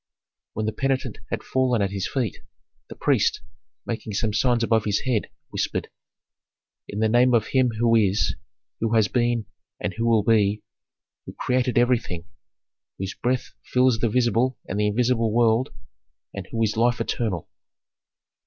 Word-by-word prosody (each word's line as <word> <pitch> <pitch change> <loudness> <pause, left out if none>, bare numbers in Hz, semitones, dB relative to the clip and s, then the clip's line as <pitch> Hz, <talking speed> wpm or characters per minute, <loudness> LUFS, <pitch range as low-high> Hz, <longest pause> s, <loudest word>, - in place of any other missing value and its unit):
When 110 - -2
the 110 - 0
penitent 135 +2 -2
had - - -3
fallen 125 -5 +1
at 100 - -1
his 100 -1 -2
feet, 125 -8 -2 0.5
the - - -8
priest, - - +1 0.4
making 110 -3 -4
some 110 0 0
signs 120 0 +2
above 115 -2 +2
his 105 -1 +1
head, 120 -5 -1 0.2
whispered, - - -2 1.0
"In 105 +2 -4
the 110 - +4
name 120 +2 +4
of 110 -2 +1
Him 130 -2 +3
who 115 0 +3
is, 105 -2 +2 0.5
who 115 0 0
has 110 -2 +4
been, 120 -2 0 0.3
and - - -3
who 115 +1 -1
will 115 -3 +4
be, 105 -1 +2 0.6
who - - -7
created 125 -2 0
everything, 115 -9 +1 0.7
whose 95 0 -4
breath 125 +1 -2
fills 125 -2 +2
the 115 - +1
visible 125 +2 +1
and 100 - -3
the 105 - +2
invisible 115 +1 +1
world, 120 +3 +3 0.6
and - - -6
who 115 0 -1
is 105 -1 0
life 120 +2 +2
eternal." 100 -9 -2
115 Hz, 155 wpm, -24 LUFS, 105-125 Hz, 1.0 s, the